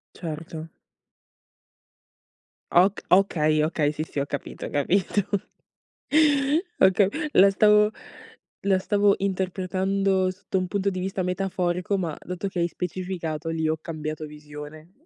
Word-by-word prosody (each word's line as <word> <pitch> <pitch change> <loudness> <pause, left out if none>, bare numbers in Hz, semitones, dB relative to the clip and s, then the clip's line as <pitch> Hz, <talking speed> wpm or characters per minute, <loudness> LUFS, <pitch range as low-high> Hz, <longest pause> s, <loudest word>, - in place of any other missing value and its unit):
Certo. 160 -1 -6 2.0
Ok 185 +3 +4
okay, 155 -5 +3
okay 155 -2 +1
sì, 155 +1 -3
sì 145 - -5
ho 140 - 0
capito, 145 0 -6
ho - - -5
capito. 185 +7 +1 1.5
Oka 190 +1 +6 0.3
la 195 +1 +7
stavo 210 +1 +5 0.8
la 190 -1 +4
stavo 205 0 +3
interpretando 190 0 0
sotto 190 0 -4
un 185 -1 -1
punto 200 +1 0
di 185 -1 -4
vista 190 +1 -2
metaforico, 180 +1 -1
ma 165 -5 -3
dato 180 +2 -5
che 180 - -4
hai 170 - +2
specificato 170 -3 -4
lì 160 -1 -1
ho 160 - 0
cambiato 155 -1 -5
visione. 150 +2 -11
180 Hz, 125 wpm, -25 LUFS, 155-190 Hz, 2.0 s, la